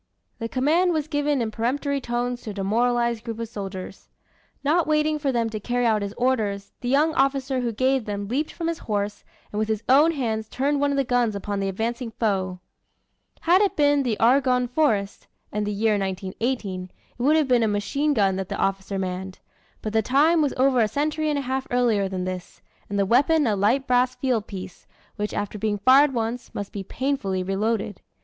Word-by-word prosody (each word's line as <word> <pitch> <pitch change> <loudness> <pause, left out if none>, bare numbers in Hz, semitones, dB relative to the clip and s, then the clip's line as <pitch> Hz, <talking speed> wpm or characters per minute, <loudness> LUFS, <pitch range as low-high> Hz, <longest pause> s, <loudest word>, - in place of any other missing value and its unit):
The 230 -1 -3
command 325 +9 +2
was 310 -2 -1
given 290 -4 0
in 220 - -3
peremptory 275 +5 -1
tones 245 0 -2
to - - -7
a - - -4
demoralized 235 +3 +1
group 225 -1 -5
of 230 0 -4
soldiers. 195 -3 -7 0.5
Not 315 +4 +2
waiting 305 0 +2
for 285 -2 0
them 235 -2 0
to 215 - -4
carry 245 +3 -1
out 220 -2 +2
his 200 0 -4
orders, 215 -6 0
the 245 - -2
young 300 +4 +3
officer 270 -1 +1
who 240 -2 -1
gave 260 +2 +1
them 205 -1 -4
leaped 280 +8 -1
from 330 - -4
his 335 0 -2
horse, 205 -1 -3 0.3
and 210 - -3
with 215 - 0
his 220 0 -2
own 295 +6 +5
hands 220 -6 -2
turned 280 +2 0
one 285 - +2
of 280 - 0
the 275 - +3
guns 245 -4 +1
upon 200 0 -3
the 195 0 -1
advancing 230 +5 -3
foe. 190 -5 -1 0.8
Had 355 +3 +4
it 405 - +1
been 290 -1 +3
the 240 -5 -1
Argonne 250 +1 +3
Forest, 230 -7 0 0.2
and 210 0 -2
the - - -1
year 210 0 +1
1918, 190 0 -3 0.3
it - - -4
would 290 +5 +4
have 310 -3 +3
been 250 -2 +4
a 225 - +3
machine 280 +9 0
gun 195 -4 +2
that 190 -1 -4
the - - -3
officer 195 0 -1
manned. 185 0 -4 0.5
But 215 - -3
the 220 - +3
time 300 +8 +3
was 290 -3 0
over 260 -1 +3
a 220 - +3
century 305 +6 -1
and 295 - 0
a 280 - -2
half 265 +1 -2
earlier 230 -6 +2
than 185 -1 -3
this 185 -1 -6 0.3
and 200 - -2
the 200 - +2
weapon 285 +8 +3
a 215 -4 +2
light 225 +8 +2
brass 250 0 +2
field 245 -5 -1
piece, 185 -2 -9 0.3
which 210 0 -3
after 205 +1 -3
being 210 0 0
fired 270 +7 +6
once, 235 0 -3
must 205 -1 -4
be 200 - -5
painfully 195 -4 -2
reloaded. 205 +1 -1
235 Hz, 205 wpm, -24 LUFS, 205-275 Hz, 0.8 s, fired